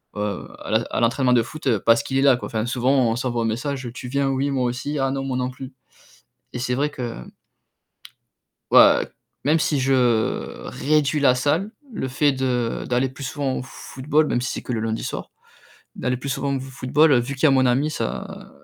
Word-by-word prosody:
heu, 105 -2 -3
à - - 0
à - - -2
l'entraînement 125 +2 +2
de 120 -2 +4
foot 130 -2 -1
parce 115 0 +5
qu'il 135 - -2
est 135 - +3
là, 140 -2 +6
quoi, 120 - -6
enfin, 110 0 -2
souvent 125 0 +2
on - - -1
s'envoie 120 -2 -1
un - - -1
message: 130 +3 -3
«Tu 125 - -7
viens? 140 +1 0
Oui? 135 +1 0
Moi 130 -2 0
aussi. 125 +5 -3
Ah 135 0 +1
non, 135 0 -2
moi 130 -2 -2
non 125 0 -1
plus». 130 +1 -9 0.8
Et - - -4
c'est 125 0 -1
vrai 145 +3 0
que 125 -5 -5 1.6
ouais, - - +7 0.4
même 155 +4 +3
si 150 - +1
je 135 +1 +1 0.8
réduis 150 0 +1
la 130 -3 +5
salle, 155 +10 0 0.2
le 130 - -3
fait 140 +2 +2
de 125 -3 -1
d'aller 125 +2 +1
plus 130 +2 -11
souvent 135 -1 -2
au - - -4
football, 145 +4 -1
même 125 - 0
si 130 - -2
c'est - - -5
que - - -5
le 115 - -1
lundi 110 0 -2
soir, - - -5 0.6
d'aller 125 0 -1
plus 140 +3 -5
souvent 140 +1 -1
au - - -3
football 135 +2 +2
vu 140 +4 -4
qu'il 130 - -8
y - - +9
a - - +5
mon 130 -1 +4
ami, 135 +5 +2
ça - - -5
130 Hz, 210 wpm, -22 LUFS, 125-140 Hz, 1.6 s, y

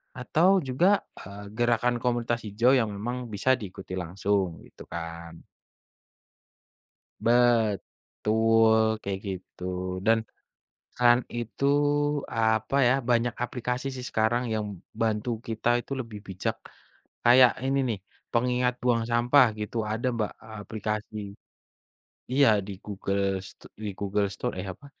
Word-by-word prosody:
atau 170 +9 +3
juga, 175 +10 +2 0.2
eee, 100 +1 -9
gerakan 120 0 +2
komunitas 120 -1 0
hijau 115 +5 +3
yang 125 -4 +3
memang 120 +4 -4
bisa 105 +3 -2
diikuti 95 -2 -6
langsung 95 0 -1
gitu - - -14
kan. 85 0 -7 1.8
Betul, 115 -1 +2 0.2
kayak 95 -1 -3
gitu 95 -1 -7 0.4
dan 115 0 +5 0.8
kan 120 -1 +6 0.2
itu 120 +3 -3 0.7
apa 110 +2 +1
ya, 125 - +5 0.2
banyak 120 0 +2
aplikasi 125 +2 -3
sih 125 -1 -6
sekarang 110 +3 +1
yang 110 -1 -1 0.4
bantu 110 +1 0 0.2
kita 115 0 -3
itu - - -22
lebih 115 -4 -9
bijak. 95 -1 -2 0.7
Kayak 125 +1 +7
ini 135 +1 +1
nih 110 -4 -1 0.3
pengingat 125 +1 +1
buang 120 -2 +2
sampah 120 +4 +5
gitu, 105 +2 -5 0.2
ada 115 +3 -2
Mbak 110 -2 -1 0.3
aplikasi 110 0 -4 1.2
iya 140 +1 +5 0.2
di - - -5
Google 100 -1 -2 0.3
Sto - - -16 0.2
di - - -2
Google 100 0 0
Store - - -3
eh 90 - -4
apa, 140 - -18
115 Hz, 120 wpm, -27 LUFS, 105-125 Hz, 1.8 s, Kayak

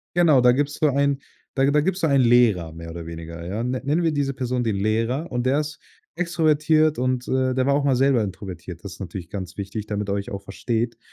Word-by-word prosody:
Genau, 160 -7 +5
da 125 0 +6
gibt's 145 +3 0
so 155 - +4
einen 140 0 +1 0.4
da 135 - +3
da 145 +2 +3
gibt's 190 +4 -1
da 160 - +3
einen 140 -3 +4
Lehrer 115 -9 +4
mehr 85 0 -9
oder 85 0 -7
weniger, 85 0 -8
ja. 100 +6 -3
Nenn 125 +1 -2
nennen 155 +5 +1
wir 165 - +2
diese 140 -2 -1
Person 125 -1 -2
den 110 -3 0
Lehrer, 115 - 0
und 125 0 -1
der 135 +3 +3
ist 150 0 -5 0.4
extrovertiert 155 -3 +2
und, 125 0 -1
äh, 130 0 +1
der 130 0 +1
war 140 - +3
auch 145 - +1
mal 135 -2 +3
selber 130 -2 +3
introvertiert. 95 -3 -7
Das 100 -3 -7
ist - - -14
natürlich 90 -2 -7
ganz 95 -2 -6
wichtig, 100 +2 -5
damit 105 -1 -3
er - - +1
euch 100 0 -4
auch 100 -1 -5
versteht. 115 +4 -2
125 Hz, 235 wpm, -23 LUFS, 100-145 Hz, 0.4 s, da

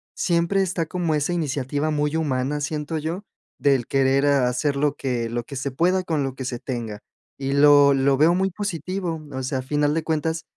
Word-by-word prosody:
siempre 170 +3 +1
está 175 -3 -1
como 170 -1 -1
esa 150 +4 0
iniciativa 145 -2 -1
muy 150 0 0
humana, 145 -2 -1
siento 150 +1 -3
yo, 165 +6 -4 0.3
del 135 -4 +2
querer, 135 +1 +2
ah, 140 -3 +3
hacer 140 +3 -1
lo 145 +1 +1
que 125 -3 -2
lo 120 0 -3
que 140 - -9
se 135 +1 -3
pueda, 180 +7 +1
con 160 -5 -1
lo 135 -1 -4
que 130 - -6
se 120 -2 -4
tenga, 115 -5 -5 0.4
y 135 0 -2
lo 145 0 +6
lo 135 0 +3
veo 165 +4 +4
muy 190 +1 0
positivo, 180 -2 -3
o 130 0 -4
sea, 130 0 -2
a - - -3
final 145 +2 +1
de 165 - -1
cuentas, 160 +1 -1
145 Hz, 205 wpm, -23 LUFS, 135-165 Hz, 0.4 s, lo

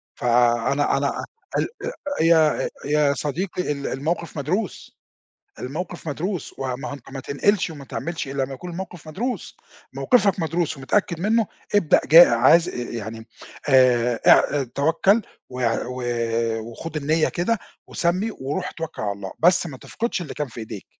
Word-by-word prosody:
فأنا 120 +3 +2
أنا - - +1
أ - - -4 0.4
ال - - 0 0.5
يا 160 -2 +4
آآ - - -2 0.2
يا 145 -1 +3
صديقي 170 +4 -2
ال 140 -1 -3
الموقف 160 +4 -3
مدروس، 180 +9 -3 0.6
الموقف 165 +5 -5
مدروس. 175 +5 -3
و 130 -2 -2
ما 145 +4 -6
أهو - - -5
أنت 135 -2 -11
ما 135 - -5
تنقلش 180 +9 +1
وما 145 -4 -9
تعملش 165 -1 -4
إلّا 135 -1 -1
ما 135 - -8
يكون 175 +7 -8
الموقف 175 -3 -7
مدروس. 240 +11 -4 0.4
موقفك 205 -7 +3
مدروس 165 -2 -1
ومتأكد 170 +4 0
منّه، 220 +3 +2 0.3
ابدأ 185 -7 +4
ج 160 - +2
عايز 165 +3 +7
آآ - - -8 0.2
يعني 110 0 -6 0.4
آآ 125 -3 +4
اع 145 -2 +5
توكّل 165 - +2 0.3
وع 125 -3 -1
و 125 0 -5 0.6
وخُد 150 +8 -7
النيّة 155 +2 +1
كده 195 +5 0 0.3
وسمّي 185 +6 0
وروح 135 -3 -4
اتوكّل 165 -5 -6
على 100 -1 -1
الله، 100 -1 -7
بس 175 +1 +4
ما 135 -5 -8
تفقدش 230 - -3
اللي 155 - -6
كان 150 -2 -3
في 115 - -10
إيديك. 110 -3 -7
150 Hz, 155 wpm, -23 LUFS, 130-175 Hz, 0.6 s, عايز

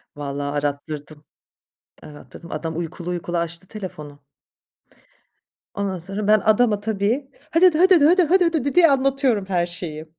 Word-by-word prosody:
Valla 145 0 -4
arattırdım. 145 +1 -5 0.8
Arattırdım. 150 +3 -13
Adam 160 +1 -4
uykulu 170 +1 -5
uykulu 175 0 -3
açtı 170 +2 -4
telefonu. 150 -9 -9 1.5
Ondan 195 -2 -3
sonra, 195 +4 -5
ben 215 0 +5
adama 215 0 +2
tabii 220 +6 -2 0.2
"hö 330 - +2
dö 365 -2 +7
dö 310 - -1
hö 370 - +6
dö 370 -3 +6
dö 290 - +4
hö 355 - +4
dö 365 - +5
hö 375 +2 +5
dö 315 -6 0
dö" 285 - -1
diye 350 -1 +6
anlatıyorum 270 -6 +1
her 180 -3 0
şeyi. 170 -3 -5
190 Hz, 165 wpm, -21 LUFS, 155-245 Hz, 1.5 s, dö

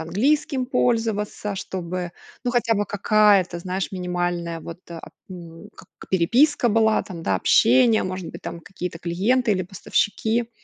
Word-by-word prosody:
английским 255 - 0
пользоваться, 225 -5 -1
чтобы, 185 -2 -5 0.3
ну 250 - -1
хотя 240 -2 +1
бы 205 -1 -1
какая-то, 200 -3 +3
знаешь, 185 +2 -3
минимальная 175 -2 -2
вот, 170 +1 -9
а, 165 -1 -9 0.2
м, 170 +1 -10
как - - -15 0.2
переписка 240 - +3
была, 220 0 +3
там, 170 -4 -8
да, 95 -10 +1
общение, 235 - +4
может 185 -2 -5
быть, - - -11
там 170 - -6
какие-то 180 -1 -7
клиенты 215 +8 +1
или 185 -2 0
поставщики. 215 +5 -1
195 Hz, 140 wpm, -23 LUFS, 175-225 Hz, 0.3 s, общение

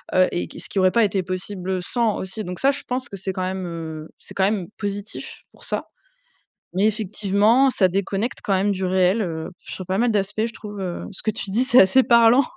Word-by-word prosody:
heu 185 0 +6
et 90 0 -2
qui - - -11
ce - - -7
qui 195 - -2
aurait 185 0 +5
pas 235 +2 +4
été 200 -2 +1
possible, 185 +1 -5
heu, 190 -1 0
sans 230 +2 0
aussi. 190 +4 -5
Donc 180 -1 -6
ça, 275 - +4
je 280 - -5
pense 250 0 -2
que 200 - -8
c'est 190 0 -4
quand 185 - -3
même, 185 0 -3
heu, 160 -2 -6
c'est - - -13
quand 190 - +1
même 195 -3 0
positif 205 0 -5
pour - - -18
ça. - - -2 0.9
Mais 195 +3 +3
effectivement, 215 +4 +3
ça 190 -6 +3
déconnecte 195 +5 -2
quand 200 - 0
même 195 +2 +2
du 190 -1 -2
réel, 185 +3 +2
heu, 160 -3 -4
sur 185 - -8
pas 190 +1 0
mal 240 +2 +2
d'aspects 210 +1 0
je 230 - -10
trouve, 210 -2 -8
heu, 180 -2 -4
ce 195 - -10
que 215 - +1
tu 210 -1 -6
dis, 230 +6 +2
c'est 255 -1 +6
assez 195 +8 +5
parlant, 235 +2 +6
195 Hz, 240 wpm, -22 LUFS, 185-220 Hz, 0.9 s, heu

